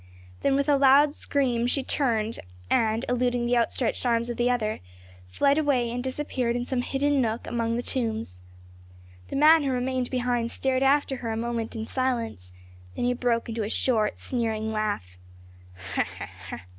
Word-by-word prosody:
Then 275 - +2
with 280 +1 +1
a 290 -1 +4
loud 280 +2 +6
scream 250 -6 0
she 270 +2 0
turned, 230 -6 0 0.3
and, 225 +1 +2
eluding 245 -1 +1
the 245 +1 +2
outstretched 235 0 0
arms 235 -1 +1
of 240 - -6
the 240 +1 +2
other, 220 -4 0 0.5
fled 280 - +2
away 260 -6 +1
and 245 +1 -3
disappeared 260 -3 -2
in 245 0 -2
some 255 -1 -1
hidden 280 +2 +1
nook 225 -1 -1
among 230 -1 -1
the 240 - -2
tombs. 220 - -3 0.9
The - - -6
man 310 +3 +7
who 280 - -1
remained 255 0 -1
behind 245 -2 0
stared 260 +1 0
after 270 0 +2
her 235 -2 -5
a 220 - -2
moment 230 -1 -3
in 220 0 -3
silence, 230 - -2 0.4
then - - -1
he 250 - +2
broke 240 -2 0
into 230 -1 -3
a 210 - -2
short 220 -3 +1
sneering 220 -3 -2
laugh. 205 - -2
245 Hz, 165 wpm, -26 LUFS, 230-265 Hz, 0.9 s, man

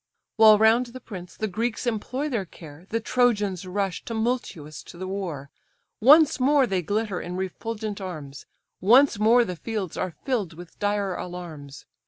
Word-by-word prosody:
While 220 -1 +8
round 225 +3 +4
the 250 +2 -10
prince 185 -7 -10
the 215 - -1
Greeks 225 +5 -2
employ 245 +5 -2
their 235 -9 -1
care, 160 0 -13
The 230 - 0
Trojans 210 -6 +1
rush 195 -1 -2
tumultuous 220 - -3
to - - -12
the 185 +1 -5
war; 175 -8 -5 0.5
Once 300 +6 +6
more 275 +1 +4
they 190 -5 -1
glitter 205 +2 -2
in 180 +1 -5
refulgent 210 +2 -4
arms, 150 -7 -8 0.3
Once 235 +3 +5
more 230 +3 +5
the 180 -3 -5
fields 205 -1 -4
are 185 -3 -3
fill'd 225 - -1
with 175 0 -13
dire 205 -2 0
alarms. 160 -6 -8
205 Hz, 160 wpm, -25 LUFS, 180-235 Hz, 0.5 s, While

